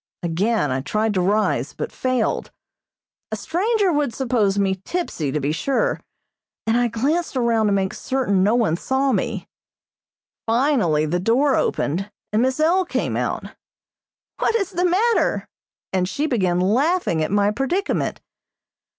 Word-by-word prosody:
Again 175 - 0
I 130 +1 -1
tried 215 +8 0
to 185 - +1
rise, 210 +4 +1
but - - -5
failed. 255 -3 -1 0.8
A - - -1
stranger 395 +2 +1
would 290 -6 0
suppose 230 -7 +1
me 190 -2 0
tipsy, 195 - -2
to 150 - -1
be 145 +1 -1
sure, 275 - 0 0.6
and 225 - +2
I 245 0 +3
glanced 280 +7 -1
around 230 -3 +2
to - - +2
make 195 -1 0
certain 250 -8 0
no 210 +5 +3
one 215 -9 +2
saw 265 +6 0
me. 220 -3 -2 1.0
Finally 225 - +2
the 175 +4 0
door 255 +8 +3
opened, 185 +8 -1 0.2
and 215 - +3
Miss 260 +3 +1
L. 345 +5 +3
came 360 - -2
out. - - -2 0.9
"What - - +1
is 395 -4 0
the 360 0 0
matter?" 445 +6 +1 0.5
and 185 -1 +1
she 290 +9 -1
began 185 - +1
laughing 230 - +1
at - - -1
my 205 0 +2
predicament. 305 - -1
230 Hz, 150 wpm, -22 LUFS, 190-285 Hz, 1.0 s, I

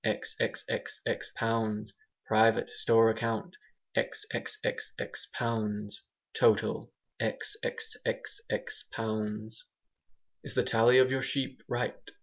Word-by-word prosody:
xxxx - - -2
pounds 110 -2 0 0.3
Private 110 +1 +4
store 115 -1 +5
account............... 115 - -2 0.4
xxxx 445 0 -3
pounds 105 - -2 0.3
Total............................... 470 - +3 0.3
xxxx 455 0 -3
pounds 110 0 -2 0.8
"Is - - -6
the - - +4
tally 115 +3 +6
of 130 0 +7
your 130 0 +1
sheep 135 -1 -1
right?" - - -1
115 Hz, 85 wpm, -31 LUFS, -, 0.8 s, of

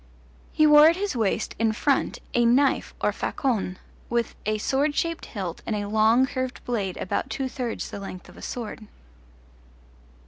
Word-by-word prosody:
He 310 - +4
wore 300 0 +8
at 335 - +2
his 400 -2 -2
waist, 220 -5 0
in 225 -1 +2
front, 275 +5 +1 0.2
a 240 - +3
knife 260 +4 +2
or - - +2
facon, 215 -9 -1 0.3
with 235 -1 0
a 215 0 +1
sword 280 +6 0
shaped 335 0 -2
hilt 185 -5 -5
and 220 - -2
a 205 -1 -3
long 220 +4 +4
curved 260 -1 -4
blade 205 -7 -2
about - - -2
two 270 - -2
thirds 250 -3 -4
the - - -6
length 185 -2 -8
of - - -15
a - - -13
sword. 225 -2 -6
235 Hz, 170 wpm, -25 LUFS, 215-275 Hz, 0.3 s, wore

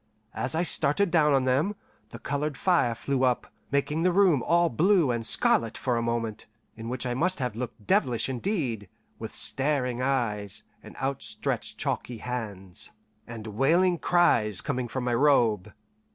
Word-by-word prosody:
As 130 +3 -2
I 165 - +1
started 165 +3 +1
down 155 -3 +4
on 135 -1 +2
them, 140 +11 +1 0.3
the - - -9
coloured 145 0 -3
fire 170 -11 +2
flew 135 +2 -1
up, 125 -2 0 0.2
making 140 +3 0
the 180 +1 +3
room 175 -7 +4
all 170 +6 +3
blue 170 - +3
and 120 -1 -2
scarlet 115 0 +3
for 125 -2 -1
a 115 - 0
moment, 115 -2 -3 0.3
in 115 +1 -7
which 125 +1 -4
I 125 - -1
must 180 +8 0
have 125 -5 -3
looked 115 -3 -6
devilish 120 +2 +1
indeed, 125 - -3 0.3
with - - -6
staring 130 -3 -1
eyes, 115 -7 -1 0.2
and - - -13
outstretched 135 0 -2
chalky 120 - -3
hands, 105 -6 -7 0.3
and 115 -2 -8
wailing 165 - +2
cries 110 - +2
coming 125 -1 -2
from 130 +2 -4
my 125 -1 0
robe. 115 -7 +2
130 Hz, 160 wpm, -27 LUFS, 115-150 Hz, 0.3 s, down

